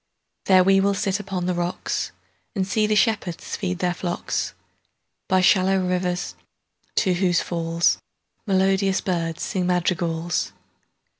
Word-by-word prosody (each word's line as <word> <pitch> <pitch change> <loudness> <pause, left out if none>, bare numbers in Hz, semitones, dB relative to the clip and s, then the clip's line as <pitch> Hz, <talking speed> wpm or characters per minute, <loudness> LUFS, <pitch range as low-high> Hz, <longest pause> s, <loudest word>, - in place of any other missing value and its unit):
There 185 -1 +6
will 195 +1 +4
we 200 +1 +2
sit 195 +1 0
upon 190 -3 -3
the 180 - 0
rocksAnd 180 +3 -4
see 210 +2 +1
the 215 - +2
shepherds 210 -6 0
feed 185 -2 -2
their 180 0 0
flocks, 175 0 -3 0.7
By 185 0 +3
shallow 190 +1 +4
rivers, 180 0 -1 0.6
to 190 -4 +3
whose 175 -1 +2
fallsMelodious 190 +3 0
birds 165 -3 -1
sing 180 -2 -1
madrigals. 175 -2 0
185 Hz, 120 wpm, -23 LUFS, 175-195 Hz, 0.7 s, There